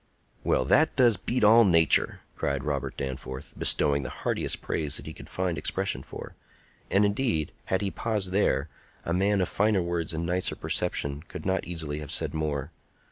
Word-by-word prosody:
"Well, 65 - +1
that 155 - +3
does 120 -5 +5
beat 115 +7 -2
all 115 +3 +7
nature!" 85 -6 +4
cried 70 -2 -2
Robert - - -3
Danforth, 65 0 -6
bestowing 70 0 +3
the 65 - -5
heartiest - - -2
praise 75 -3 -2
that - - -8
he - - -7
could - - -12
find 90 -2 -2
expression 95 -8 -1
for; - - -9 0.6
and, 100 +2 +3
indeed, 100 - 0
had 95 - 0
he 100 -1 -2
paused 105 -5 -2
there, 90 -7 +1 0.4
a 85 - -1
man 100 +2 +2
of 90 - +1
finer 105 -2 +1
words 85 -1 -2
and 80 +1 -2
nicer 90 +2 0
perception 70 +1 -1
could - - -9
not 95 0 0
easily 80 -4 -5
have 75 -2 -8
said - - 0
more. 75 -3 -3
85 Hz, 180 wpm, -27 LUFS, 75-100 Hz, 0.6 s, all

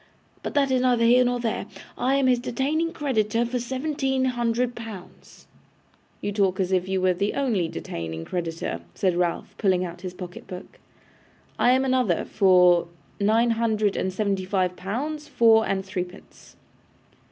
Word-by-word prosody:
But - - -5
that 275 -2 +3
is 255 -1 +2
neither 245 -2 +3
here 245 +2 +6
nor 245 0 0
there. 235 -2 -2 0.3
I 265 +2 +1
am 275 -1 +2
his 250 -1 +3
detaining 270 +7 -1
creditor 235 -8 0
for 245 +1 -2
seventeen 265 +1 -1
hundred 240 -1 0
pounds!' 225 -6 -11 0.8
'You 205 - -2
talk 195 -2 +1
as 190 -1 0
if 185 -1 +1
you 190 0 +1
were 185 0 +3
the 200 +3 -1
only 230 -11 +1
detaining 80 - -6
creditor,' 165 - -3
said 185 -2 +1
Ralph, 175 -1 -1
pulling 185 -3 +2
out 175 0 -8
his 185 -1 -6
pocket 180 -1 -9
book. 180 0 -10 0.8
'I 245 - +5
am 260 +1 +2
another 255 -9 +1
for 180 -3 +4 0.3
nine 225 +3 +3
hundred 220 -3 +1
and 190 - -1
seventy 195 -1 -1
five 185 -1 0
pounds 290 +12 -4
four 225 -5 +4
and 190 -1 -1
threepence. 185 -1 -8
215 Hz, 160 wpm, -25 LUFS, 185-250 Hz, 0.8 s, here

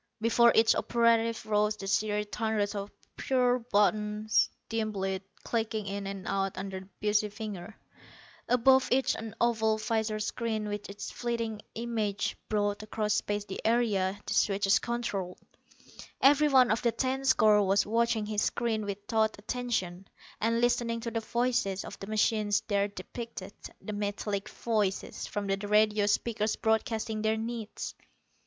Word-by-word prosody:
Before 235 +1 +5
each 225 0 +6
operative 230 -1 +2
rose 210 0 +1
the 195 - -7
serried 210 +1 0
hundreds 220 -2 0
of 200 0 -4 0.3
pearl 250 -2 +1
buttons, 210 +1 +2 0.2
dim 220 -1 -2
lit, 190 -1 -2 0.2
clicking 220 -2 -2
in 200 0 -4
and 195 -1 -6
out 195 -1 -1
under 190 0 -4
the 190 +1 -14
busy 210 0 +1
fingers. 210 -1 -7 0.7
Above 260 +2 +5
each, 265 +1 +3
an 220 -1 -7
oval 220 -2 +2
visor 220 0 -1
screen 220 0 -2
with 205 -1 -5
its 200 0 -6
flitting 230 -3 -3
images 220 -3 -1 0.2
brought 205 -1 0
across 215 0 -1
space 205 0 -1
the 195 - -6
area 205 -4 +1
the - - -2
switches 195 -1 +3
controlled. 210 -7 -3 0.8
Every 290 +2 +5
one 260 -4 +5
of 220 - +1
the 235 - +2
ten 260 +3 -1
score 215 -5 +5
was 195 0 +3
watching 230 0 +1
his 210 0 -1
screen 225 -3 0
with 200 0 -5
taut 220 0 +1
attention, 205 -5 -3 0.3
and 230 +2 +1
listening 240 -1 +1
to 230 0 -4
the 225 - -1
voices 235 -4 0
of - - -9
the 195 - -7
machines 215 -1 +1
there 200 -1 +2
depicted 205 0 -8 0.3
the 215 - -6
metallic 205 0 -3
voices 210 -5 -2
from 205 -1 -3
the 195 0 0
radio 210 0 +3
speakers 215 0 0
broadcasting 220 0 0
their 220 0 +1
needs. 225 -1 -5
215 Hz, 150 wpm, -29 LUFS, 205-230 Hz, 0.8 s, each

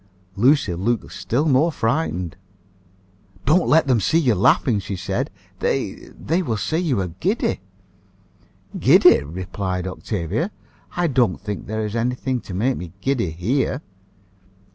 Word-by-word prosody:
Lucia 120 - +3
looked 110 +6 -1
still 140 +7 -1
more 150 +4 +3
frightened. 115 - -1 1.1
"Don't 170 +4 +3
let 160 +2 +5
them 125 -4 +3
see 105 - +2
you 135 -8 +3
laughing," 105 +3 +3
she 100 +1 -5
said. 95 +1 -2 0.3
"They - - -2
they 165 +5 0
will 120 -10 -2
say 105 - -1
you 155 - 0
are 90 - -3
giddy." 200 +7 0 1.2
"Giddy!" - - +6
replied 90 +4 -4
Octavia. 95 - -2 0.5
"I 175 - +2
don't 125 - +2
think 105 0 -5
there 110 0 -2
is 105 +1 -4
any 120 +2 0
thing 130 0 -2
to 95 - -9
make 125 +7 +1
me 90 -1 -8
giddy 125 -5 0
here." 125 - -1
115 Hz, 140 wpm, -22 LUFS, 95-140 Hz, 1.2 s, Giddy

